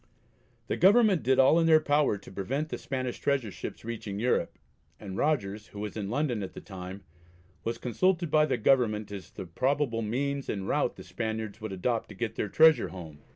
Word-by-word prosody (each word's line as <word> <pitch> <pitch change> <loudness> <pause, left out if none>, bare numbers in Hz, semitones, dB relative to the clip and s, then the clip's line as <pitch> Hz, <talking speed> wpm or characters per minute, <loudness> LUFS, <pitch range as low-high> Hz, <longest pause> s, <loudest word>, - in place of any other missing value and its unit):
The - - -2
Government 200 -1 +5
did 130 +1 +2
all 135 +5 +6
in 165 - +3
their 160 -1 +7
power 145 -7 +2
to 95 - -13
prevent 135 +11 -3
the - - -4
Spanish 130 -2 -4
treasure 135 -7 0
ships - - -8
reaching 110 -4 -5
Europe, 125 +3 0 0.4
and 95 -2 -7
Rogers, 110 -7 -1
who 100 - -10
was 105 0 -5
in 100 -3 -4
London 125 -2 0
at 95 - -6
the - - -8
time, 95 0 -9 0.6
was 115 0 -2
consulted 170 - 0
by 155 -1 +4
the 135 - 0
Government 110 -4 +2
as 100 -2 -7
to - - -31
the - - -5
probable 130 - 0
means 135 +5 -2
and 95 -2 -3
route - - 0
the - - -10
Spaniards 110 -1 -4
would 110 -2 -5
adopt 115 +5 -1
to 105 - -10
get 110 +2 -3
their 105 - -3
treasure 160 +6 +5
home. 80 -5 -9
115 Hz, 200 wpm, -29 LUFS, 105-145 Hz, 0.6 s, their